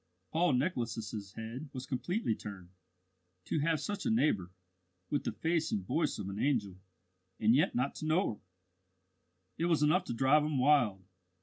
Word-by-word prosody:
Paul 165 -1 +3
Nicholas's 115 - -2
head 115 +6 -6
was 130 -1 -5
completely 160 - -1
turned. 100 -4 -8 0.8
To - - 0
have 160 +1 +1
such 200 +6 -3
a - - 0
neighbour, 150 - +2 0.6
with 145 - 0
the - - 0
face 165 0 0
and 95 -3 -1
voice 150 - 0
of 100 - -5
an 100 +1 -5
angel, 105 -10 0 0.6
and 110 +1 +4
yet 145 +5 +3
not 125 +3 0
to 155 - -4
know 160 - +2
her! - - -14 1.2
It 165 - +1
was 165 -3 +3
enough 175 +5 +3
to - - -3
drive 135 +5 +4
him 150 -2 -1
wild. 125 -8 +3
135 Hz, 170 wpm, -32 LUFS, 110-155 Hz, 1.2 s, and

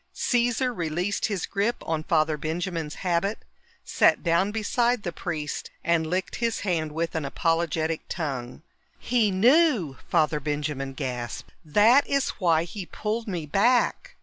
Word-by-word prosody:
Caesar 245 +1 +2
released 175 +1 -1
his 200 -5 -2
grip 210 +4 0
on 160 -1 -1
Father 155 -1 +2
Benjamin's 160 0 -3
habit, 185 +4 +1 0.5
sat - - +3
down 170 +3 +2
beside 235 +2 0
the 175 - -3
priest, 155 -5 -4
and 165 -1 +1
licked 185 +3 -2
his 230 -1 -1
hand 165 -6 -1
with 165 +2 -2
an 160 - -2
apologetic 165 +2 0
tongue. 140 -5 -4 0.3
"He 235 -4 +1
knew!" 225 - +3
Father 150 -1 +2
Benjamin 145 -2 -3
gasped. 125 -4 -5
"That 215 - +5
is 275 -1 +1
why 165 -4 +3
he 185 +1 -7
pulled 225 +2 -3
me 175 -6 -3
back!" 235 - +1
170 Hz, 140 wpm, -26 LUFS, 155-215 Hz, 0.5 s, That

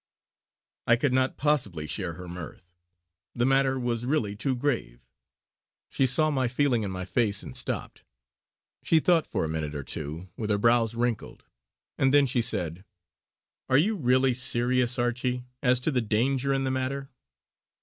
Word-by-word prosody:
I 115 - +6
could 125 +2 0
not 130 0 +1
possibly 120 - 0
share 85 +2 -3
her 90 +2 -9
mirth; 85 0 -9 0.6
the 120 - +1
matter 135 0 +3
was 120 -2 -2
really 120 -6 -1
too 130 +5 -1
grave. 120 - -3 0.9
She 135 - +2
saw 155 +5 +3
my 130 -3 +1
feeling 125 -1 +1
in 100 - -3
my 95 -1 -5
face 100 0 0
and - - -9
stopped. - - -2 0.8
She 165 - +3
thought 165 0 +2
for - - -1
a - - -2
minute 80 -2 -3
or 70 - -4
two 75 +7 -5
with 110 -2 -4
her 105 - +2
brows 115 +1 +2
wrinkled 120 -2 -3 0.6
and 135 0 +3
then 145 0 +5
she 125 -2 +1
said: 90 -5 0 0.9
"Are 130 - +5
you 205 +10 +2
really 130 -4 +2
serious, 125 0 +1
Archie, 125 +1 -1 0.2
as 125 -2 +3
to 155 - 0
any 125 -3 +1
danger 125 +5 0
in 135 0 +1
the 130 - -1
matter?" 135 +1 -3
125 Hz, 165 wpm, -27 LUFS, 105-135 Hz, 0.9 s, I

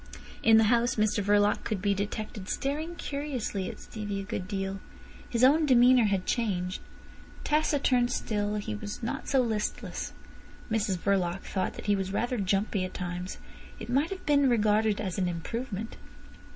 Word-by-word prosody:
In 225 0 +6
the 225 - +6
house 240 +1 +2
Mr 215 -1 +1
Verloc 205 +1 +3
could 215 -3 -2
be 200 +1 +1
detected 205 0 -4
staring 310 +5 -2
curiously 270 - -3
at - - -9
Stevie 205 -3 -5
a - - -4
good 190 -2 -4
deal. 195 -1 -3 0.5
His 235 0 0
own 300 +4 +5
demeanour 250 -2 +6
had 195 -3 0
changed. 185 -6 -1 0.6
Taciturn 285 -5 +2
still, 210 -3 -1
he 205 - -3
was 205 - -6
not 230 - -3
so 270 -2 +3
listless. 220 -3 -3 0.6
Mrs 210 -4 +1
Verloc 185 -1 0
thought 190 - -2
that - - -8
he 205 -1 +3
was 190 -1 -2
rather 240 +3 -1
jumpy 195 0 0
at 185 - -5
times. 180 0 -4 0.4
It - - -8
might 280 +6 +2
have 385 -1 -7
been 285 -2 +4
regarded 215 -2 +2
as 190 -4 -3
an 185 - +1
improvement. 220 +5 -4
210 Hz, 165 wpm, -29 LUFS, 195-245 Hz, 0.6 s, In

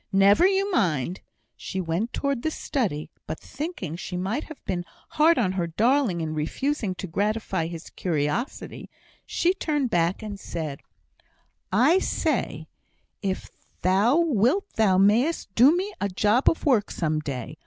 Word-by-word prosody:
"Never 200 - +5
you 390 +1 +1
mind!" 175 - 0 0.3
She 190 - -5
went 180 +7 -1
towards 280 -3 -1
the 315 - 0
study, 210 - -2 0.2
but 155 - -4
thinking 285 - -5
she 180 +1 -5
might 195 +10 -2
have 315 - -10
been 175 -2 -2 0.3
hard 320 +2 +4
on 205 -7 +2
her 180 -3 -1
darling 225 - +2
in 155 -1 -3
refusing 205 - -2
to 190 - -5
gratify 195 -1 -1
his 165 -1 -8
curiosity, 165 - -3 0.4
she 355 +2 +2
turned 295 -8 -1
back, 175 +4 +1
and 205 -2 -6
said: 155 -6 -5 0.9
"I 260 - +5
say - - -1 0.5
if 190 -2 -3 0.3
thou 200 - +4
wilt, 320 - +2
thou 200 -4 +3
mayst 210 - +2
do 275 - +6
me 400 +3 -3
a 200 - 0
job 210 +7 +3
of 325 - -3
work 245 -8 +3
some 155 -2 -1
day. 145 0 -6
205 Hz, 150 wpm, -25 LUFS, 175-280 Hz, 0.9 s, do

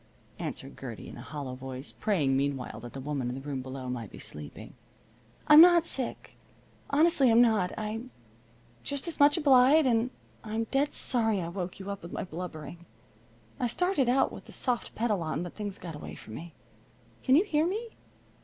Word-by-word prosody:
answered - - -6
Gertie - - -7
in - - -10
a - - -9
hollow 140 -3 -6
voice, 130 +1 -6
praying 155 -11 +1
meanwhile 135 -4 -2
that 120 +1 -9
the 135 - -6
woman 135 -2 -2
in 125 - -4
the 135 - -6
room 135 -2 -4
below 130 0 -7
might 120 -4 -4
be - - -12
sleeping. 75 -1 -7 0.7
"I'm 300 +1 +10
not 345 -1 +7
sick, 260 -6 -5 0.5
honestly 295 -2 +4
I'm 230 +1 +6
not. 220 -7 +4
I'm 220 +3 -4 0.7
just 280 +3 -3
as 335 - -4
much 290 +2 +6
obliged, 280 0 +6
and 235 -1 +2 0.3
I'm 220 +1 -2
dead 280 +2 +1
sorry 225 -5 +2
I 170 -2 -3
woke 180 +1 -5
you 195 +1 -5
up 200 - -6
with 170 - -9
my - - -3
blubbering. 170 -2 -7 0.7
I 250 - +1
started 290 - +1
out 265 +2 +3
with - - -10
the - - -12
soft 245 -3 -2
pedal 215 -5 0
on, 160 +1 -2
but 175 - -7
things 205 -2 -5
got 170 -2 -7
away 150 - -8
from 110 - -11
me. 165 +5 -9 0.7
Can 260 - +4
you 335 - +6
hear 320 -5 +1
me?" 440 +6 -3
205 Hz, 190 wpm, -29 LUFS, -, 0.7 s, I'm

